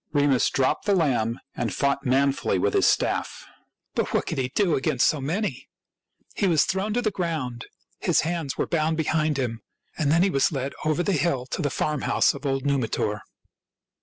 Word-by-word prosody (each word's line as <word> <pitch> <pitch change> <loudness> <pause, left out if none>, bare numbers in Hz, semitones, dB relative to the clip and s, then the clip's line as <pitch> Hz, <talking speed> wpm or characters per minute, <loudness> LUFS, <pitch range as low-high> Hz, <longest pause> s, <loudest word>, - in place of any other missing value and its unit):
Remus 145 -3 +3
dropped 130 - 0
the 200 - +4
lamb 120 -9 +1 0.2
and - - -2
fought 140 -1 0
manfully 135 -5 +2
with 100 +2 +1
his - - +4
staff. - - 0 0.5
But - - -1
what - - +1
could - - -3
he 125 -1 -1
do 195 -6 +2
against 130 -2 +2
so 150 - 0
many? 165 - -3 0.7
He 200 - +1
was 160 -5 +4
thrown 190 +5 -1
to 245 - 0
the 215 - +1
ground; 155 - -3 0.3
his - - +2
hands 165 -4 -3
were - - 0
bound 160 -1 0
behind 155 -1 +1
him; 120 -4 -2 0.3
and 145 -3 0
then 170 +3 +4
he 195 - +2
was 135 +1 +2
led 135 -2 -3
over 155 +3 +1
the 200 - 0
hill 140 -5 0
to - - -2
the 145 - 0
farmhouse 150 +1 +1
of 140 +1 -5
old 135 0 -1
Numitor. 115 -6 0
145 Hz, 190 wpm, -25 LUFS, 130-165 Hz, 0.7 s, the